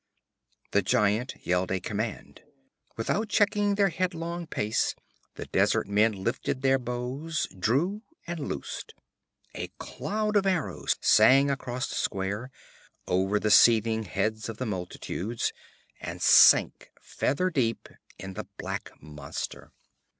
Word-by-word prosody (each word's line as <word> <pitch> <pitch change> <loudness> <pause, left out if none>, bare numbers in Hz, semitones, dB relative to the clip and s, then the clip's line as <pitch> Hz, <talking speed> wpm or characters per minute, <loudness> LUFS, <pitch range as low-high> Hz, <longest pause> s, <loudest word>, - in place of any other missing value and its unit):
_' - - -51
The 100 - +3
giant 105 +6 +1
yelled 90 +1 +1
a 95 - 0
command. 105 +3 -5 0.6
Without 205 - -1
checking 205 -1 +2
their 200 -1 +3
headlong 170 -1 -3
pace, 105 -7 -1 0.4
the - - -6
desert - - +1
men 105 -1 +2
lifted 130 +3 -2
their 135 0 +3
bows, 125 +6 -3
drew 160 - +1 0.2
and 170 -1 -5
loosed. 145 - -6 0.6
A - - -5
cloud 215 0 -3
of 195 -1 +2
arrows 185 -4 0
sang 135 +6 +6
across 130 -1 -3
the - - -7
square, 100 +6 -2 0.6
over 95 +3 +1
the 105 - 0
seething 110 0 +5
heads 105 +4 -2
of 110 - -6
the 130 - -3
multitudes, 100 +2 -3 0.5
and - - -6
sank - - +6
feather 180 +6 -1
deep 120 -7 -1 0.3
in 95 0 -8
the - - -6
black - - -5
monster. 75 -1 -7
120 Hz, 130 wpm, -27 LUFS, 105-165 Hz, 0.6 s, sang